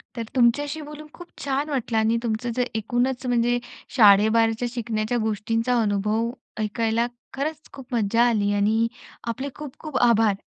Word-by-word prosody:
तर 230 - -3
तुमच्याशी 290 +6 +2
बोलून 300 +1 -9
खूप 350 - -11 0.2
छान 280 +2 -1
वाटलं 245 -5 -1
आणि 220 +1 +2
तुमचं 235 +1 -2
जे 250 - +2
एकूणच 245 +4 -1
म्हणजे 245 0 +2 0.4
शाळेबाहेरच्या 225 +2 +5
शिकण्याच्या 230 -1 -2
गोष्टींचा 225 +3 0
अनुभव 210 +2 0 0.3
ऐकायला 225 +2 0 0.3
खरंच 305 +3 -4
खूप 270 -2 -11
मज्जा 230 +2 +2
आली 205 -3 +1
आणि 220 +3 +2 0.4
आपले 260 +4 -3
खूप-खूप 295 -1 -6
आभार. 220 -3 +3
235 Hz, 135 wpm, -24 LUFS, 220-260 Hz, 0.4 s, शाळेबाहेरच्या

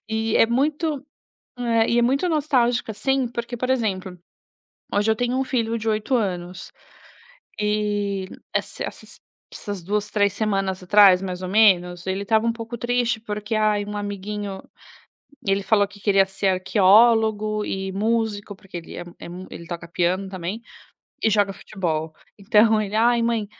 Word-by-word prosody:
E 220 0 0
é - - +6
muito, 290 +3 -1 0.5
eh, 230 -2 +2
e 235 - +3
é - - +4
muito 275 +9 +1
nostálgica 260 -8 +1
assim, 265 +4 0
porque 235 +1 -5
por 255 +2 -2
exemplo, 190 -7 -1 0.7
hoje 205 +2 +2
eu 220 - +2
tenho 245 +2 0
um 265 - +1
filho 230 -3 -1
de 225 0 -3
8 215 +4 0
anos. 180 -4 -3 0.9
E 205 -2 -1 0.3
esse - - -2
essas - - -9 0.3
essas 205 -4 -6
2, 210 +3 -1
3 205 -2 +2
semanas 195 -3 -1
atrás 190 -1 +6
mais 185 -1 -5
ou 185 - -4
menos, 180 -4 +3
ele 190 +1 -2
estava 220 +1 +2
um 230 - +2
pouco 230 +1 -7
triste 240 -1 0
porque 210 0 -4
ai, 210 -1 +2
um 210 0 -5
amiguinho, 205 -1 -5 0.8
ele 195 0 +1
falou 205 0 +2
que 205 0 -15
queria 195 -1 +3
ser 195 0 -2
arqueólogo 215 +3 +3
e 190 0 -3
músico 215 0 -1
porque 195 -3 -11
ele 165 - -10
é - - -6
é - - -9
mu 180 +2 -8
ele 170 - -9
toca 170 0 -7
piano 180 +3 0
também, 190 +4 -5 0.6
e - - +5
joga 205 -1 +2
futebol. 165 -5 -4 0.2
Então 215 +2 +4
ele 205 +1 -5
ai 235 +1 +4
mãe, 230 -3 0
210 Hz, 165 wpm, -23 LUFS, 195-230 Hz, 0.9 s, é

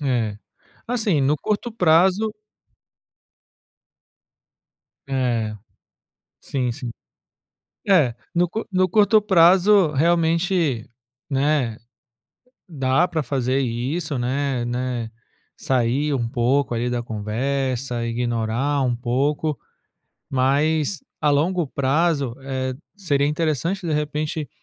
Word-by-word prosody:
É, 120 -7 -1 0.5
assim, 220 - +1
no 140 +3 +2
curto 215 - -2
prazo. 185 +2 +3 2.8
É, 120 -5 0 0.8
sim, 125 -3 -2
sim. 120 0 -6 1.0
É, 155 -12 +4 0.2
no 175 0 +2 0.2
no 185 0 +3
curto 210 +3 +4
prazo 190 -2 +5
realmente, 165 - +1 0.5
né, 135 -5 +1 0.9
dá 135 +2 +1
para 160 -4 -2
fazer 130 0 0
isso, 135 +5 -2
né 130 0 -1
né, 120 -1 -3 0.5
sair 130 +4 0
um 120 -4 -1
pouco 125 +2 +1
ali 120 +2 -1
da 120 -1 -1
conversa, 120 +3 -2
ignorar 120 +4 -1
um 125 -2 +1
pouco, 135 +4 -1 0.7
mas 145 +5 +1 0.2
a 150 - +2
longo 165 +3 +1
prazo, 140 0 0
eh, 130 -1 -3 0.2
seria 145 -8 +1
interessante, 165 - -1
de 160 - -1
repente, 150 0 -2
140 Hz, 95 wpm, -22 LUFS, 125-165 Hz, 2.8 s, prazo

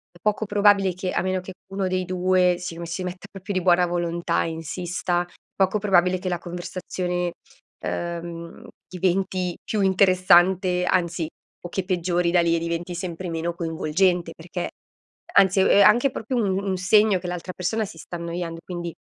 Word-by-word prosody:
è - - -15
poco 215 +1 0
probabile 205 -2 +4
che 185 +1 -3
a - - +1
meno 185 0 -1
che 185 +1 -9 0.2
uno 195 -1 -1
dei 185 0 0
due 180 0 +2
si 170 -2 -6
me 170 - -5
si 170 +3 -4
metta 180 +1 -6
proprio 195 0 -6
di 185 -2 0
buona 180 0 +4
volontà, 170 0 -1
insista, 175 +2 -2 0.3
poco 190 +2 +2
probabile 185 -3 +3
che 185 +1 -4
la 175 - -1
conversazione, 180 0 -4 0.5
ehm, 170 0 -3
mhmm, 170 0 -9 0.2
diventi 185 0 -1
più 215 - -2
interessante, 185 -1 +4
anzi, 170 -2 0 0.3
o 175 - -7
che 190 +1 -3
peggiori 175 -1 0
da 175 0 +4
lì 170 0 +2
e - - 0
diventi 170 +1 -3
sempre 180 0 -5
meno 165 +1 -2
coinvolgente 170 +1 0
perché, 175 +2 -5 0.6
anzi 190 0 +5
ehm, - - +4
è 200 - +6
anche 240 +6 +5
proprio 245 +3 -3
un 195 -4 +1
un 190 -2 -1
segno 210 +2 +4
che 180 - -7
l'altra 180 +1 -5
persona 220 +5 -1
si 180 - -11
sta 175 +2 -7
annoiando, 170 0 -4
e - - -17
quindi 175 -1 -5
180 Hz, 180 wpm, -24 LUFS, 170-190 Hz, 0.6 s, è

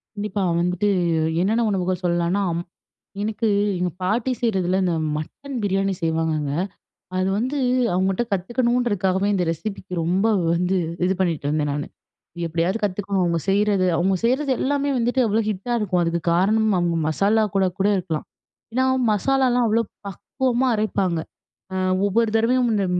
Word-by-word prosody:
கண்டிப்பா 205 -1 -2 0.2
வந்துட்டு 180 +3 0 0.5
என்னென்ன 220 +6 +2
உணவுகள் 185 -1 -1
சொல்லலானா, 175 +2 +1
அம் 170 +1 -3 0.6
எனக்கு 220 +1 -1 0.3
எங்க 180 0 0
பாட்டி 220 +7 0
செய்கிறதில 190 -5 +1
இந்த 175 -2 +1 0.2
மட்டன் 270 - -7
பிரியாணி 195 -1 0
செய்வாங்கங்க, 160 -3 0 0.7
அது 185 0 +1
வந்து 255 +6 -1 0.4
அவங்கட்ட 190 +4 +1
கத்துக்கணுன்றதுக்காகவே 205 -2 0
இந்த 180 -3 +1
ரெசிப்பிக்கு 190 +2 -6
ரொம்ப 185 +5 +1 0.3
வந்து 180 +2 +1 0.3
இது 185 - +2
பண்ணிட்டு 165 -6 -1
இருந்தேன் 150 -1 0
நானு. 145 0 -3 0.6
எப்பிடியாவது 170 +5 0
கத்துக்கணும் 200 0 -1
அவுங்க 170 -1 +1
செய்றது, 200 -1 +2
அவுங்க 190 +2 +2
செய்றது 265 +4 +1
எல்லாமே 285 +1 0
வந்துட்டு 245 +2 +1
அவ்ளோ 215 +2 +2
ஹிட்டா 210 +4 -3
இருக்கும். 185 -4 0
அதுக்கு 170 0 -1
காரணம், 215 +5 +3
அவுங்க 175 -1 +1
மசாலா 205 +7 +2
கூட, 195 -1 +3
கூட 195 - +3
இருக்கலாம். 165 -4 -3 0.5
ஏன்னா, 260 +2 +2 0.3
மசாலாலாம் 250 +2 +2
அவ்ளோ 225 +1 +2 0.3
பக்குவமா 255 +6 -1
அரைப்பாங்க. 195 -5 0 0.5
அ - - -3 0.3
ஒவ்வொரு 220 +3 +2
தடவையும் 240 +2 +3
இந்த 200 -2 +1
195 Hz, 140 wpm, -22 LUFS, 180-225 Hz, 0.7 s, காரணம்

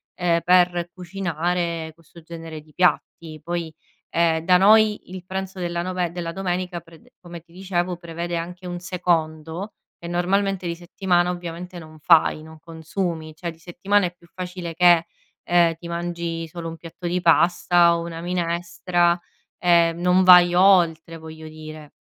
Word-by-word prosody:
ehm, 170 -2 +1
per 175 -1 +3
cucinare 175 -2 -3
questo 170 +1 -17
genere 165 -1 -9
di 155 0 -23
piatti 165 -3 0
poi, 170 -2 -4 0.4
ehm, 165 -1 +1
da 180 0 +5
noi 215 +2 +4
il 185 -1 -8
pranzo 190 0 -5
della 170 -1 -2
nove 180 -1 -2
della 170 -1 -5
domenica 180 -1 -3
prede 165 -1 -20
come 175 -1 -10
ti 170 +1 -28
dicevo 180 -1 -2
prevede 170 0 -5
anche 175 +2 -7
un 175 0 -5
secondo 170 +1 -2 0.3
e 170 - -8
normalmente 185 +2 0
di 170 - -3
settimana 175 0 0
ovviamente 175 +1 -7
non 155 -1 -13
fai, 155 0 +4
non 160 0 -13
consumi, 160 0 -5
cioè 170 +2 -5
di 160 - -17
settimana 185 +4 0
è 175 - -4
più 170 -1 -22
facile 180 -2 -6
che, 175 -1 +5 0.4
ehm, 175 -1 +3
ti 170 +1 -11
mangi 170 -1 -4
solo 165 0 -7
un 165 - -9
piatto 170 +1 -8
di 180 +1 0
pasta 170 0 +4
o - - -4
una 165 -1 -7
minestra, 175 0 0 0.4
ehm, 170 -1 +3
non 180 +1 +3
vai 180 -1 +8
oltre 175 -3 +3
voglio 160 0 -10
dire, 155 -1 -11
175 Hz, 160 wpm, -22 LUFS, 165-180 Hz, 0.4 s, vai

